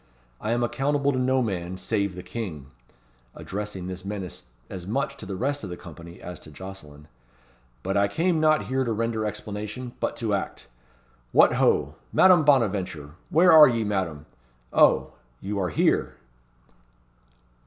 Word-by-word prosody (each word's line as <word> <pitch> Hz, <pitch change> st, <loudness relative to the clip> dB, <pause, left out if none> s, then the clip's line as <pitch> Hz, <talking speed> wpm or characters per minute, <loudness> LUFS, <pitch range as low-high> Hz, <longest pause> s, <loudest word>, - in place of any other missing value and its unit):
I 105 Hz, -, -4 dB
am 120 Hz, +1 st, +1 dB
accountable 140 Hz, +3 st, +1 dB
to 130 Hz, -, -1 dB
no 130 Hz, 0 st, +2 dB
man 95 Hz, -4 st, -3 dB
save 100 Hz, -2 st, -1 dB
the 90 Hz, -, -8 dB
King," 80 Hz, -, -6 dB, 0.6 s
addressing 100 Hz, -2 st, -5 dB
this 90 Hz, 0 st, -6 dB
menace 95 Hz, -6 st, -6 dB, 0.2 s
as 90 Hz, -2 st, -8 dB
much 140 Hz, +5 st, -1 dB
to -, -, -9 dB
the 95 Hz, -, -4 dB
rest 140 Hz, +6 st, -2 dB
of 100 Hz, -, -5 dB
the 90 Hz, -, -6 dB
company 85 Hz, +1 st, -12 dB
as 90 Hz, 0 st, -8 dB
to -, -, -13 dB
Jocelyn. 75 Hz, -4 st, -11 dB, 0.8 s
"But 95 Hz, +2 st, -2 dB
I 100 Hz, 0 st, +3 dB
came 165 Hz, -, +1 dB
not 155 Hz, 0 st, +3 dB
here 130 Hz, +1 st, 0 dB
to 115 Hz, -3 st, -1 dB
render 115 Hz, 0 st, -1 dB
explanation, 105 Hz, +4 st, -6 dB
but -, -, -1 dB
to 110 Hz, -3 st, -2 dB
act. 100 Hz, -, -3 dB, 0.7 s
What, -, -, +6 dB
ho! -, -, +2 dB, 0.2 s
Madame 180 Hz, -4 st, +6 dB
Bonaventure! 95 Hz, -, +1 dB, 0.2 s
Where 175 Hz, +3 st, +5 dB
are 155 Hz, -1 st, +10 dB
ye, 115 Hz, -2 st, 0 dB
Madame? 95 Hz, -8 st, -2 dB, 0.5 s
Oh! -, -, +4 dB, 0.3 s
you 100 Hz, +1 st, -4 dB
are 90 Hz, -2 st, 0 dB
here!" 75 Hz, -, +1 dB
105 Hz, 155 wpm, -25 LUFS, 90-130 Hz, 0.8 s, are